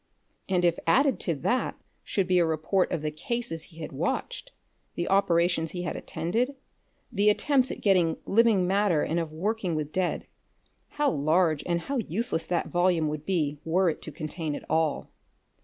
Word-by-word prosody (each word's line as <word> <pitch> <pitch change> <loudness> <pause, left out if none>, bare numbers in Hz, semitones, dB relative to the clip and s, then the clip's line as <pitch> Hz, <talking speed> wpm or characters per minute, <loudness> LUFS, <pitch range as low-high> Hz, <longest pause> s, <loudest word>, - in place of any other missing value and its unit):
And 180 -2 +2
if 170 -1 +2
added 270 - +3
to 170 - -1
that 245 - -1 0.3
should 195 - 0
be 180 0 +3
a - - +5
report 160 +4 0
of 155 - -2
the 155 - -1
cases 225 +2 -3
he 165 -2 -14
had 155 - -6
watched, - - -3 0.4
the 175 - -2
operations 170 -4 +2
he 180 -1 -4
had 180 - -3
attended, 240 +11 -2 0.6
the 210 -2 +3
attempts 260 +4 +2
at - - -6
getting 180 -5 +3
living 220 -4 +4
matter 190 -4 +2
and 165 - 0
of 165 -2 -3
working 190 +1 -2
with 155 -1 -3
dead, 185 0 -1 0.7
how 295 -1 +3
large 155 +1 +2
and 170 -1 0
how 275 +9 -3
useless 220 -4 -2
that 175 - 0
volume 175 -3 +2
would 150 0 -5
be 150 -6 0
were 175 +2 +2
it - - -9
to 155 - -6
contain 155 0 -4
it - - -7
all! 160 -2 0
175 Hz, 175 wpm, -27 LUFS, 160-200 Hz, 0.7 s, a